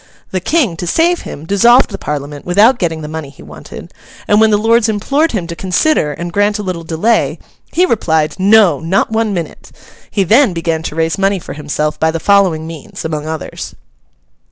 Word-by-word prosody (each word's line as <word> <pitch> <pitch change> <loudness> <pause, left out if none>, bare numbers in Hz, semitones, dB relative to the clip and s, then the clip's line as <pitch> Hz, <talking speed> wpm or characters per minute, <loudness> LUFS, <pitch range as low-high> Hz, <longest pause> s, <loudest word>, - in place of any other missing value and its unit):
The 185 - -1
King, 230 - 0
to 175 - -5
save 340 - +2
him, 150 - -9
dissolved 235 +7 +4
the 195 - -6
Parliament 145 0 -5
without 210 +8 +3
getting 160 -3 -2
the - - -5
money 155 -2 -6
he 140 - -16
wanted; 75 0 -11 0.3
and 210 +1 +4
when 220 - +5
the 210 - +3
Lords 225 +1 +2
implored 280 +10 0
him 190 -6 -2
to 170 0 -6
consider 185 - +1
and 170 +4 -6
grant 205 +2 +1
a 210 - -5
little 180 -3 -4
delay, 170 +8 0 0.3
he 360 - +3
replied, 160 - 0
'No, 205 0 +4
not 185 +6 0
one 220 -1 0
minute.' 170 -5 -6 0.4
He 200 - 0
then 225 - +4
began 165 -1 -2
to 160 - -6
raise 165 +2 -1
money 195 0 +1
for 175 - -8
himself 150 +1 -3
by 160 - +2
the 165 +1 -2
following 185 -5 +2
means 160 -2 -9
among 155 -1 -4
others. 160 0 -6
180 Hz, 195 wpm, -14 LUFS, 160-215 Hz, 0.4 s, when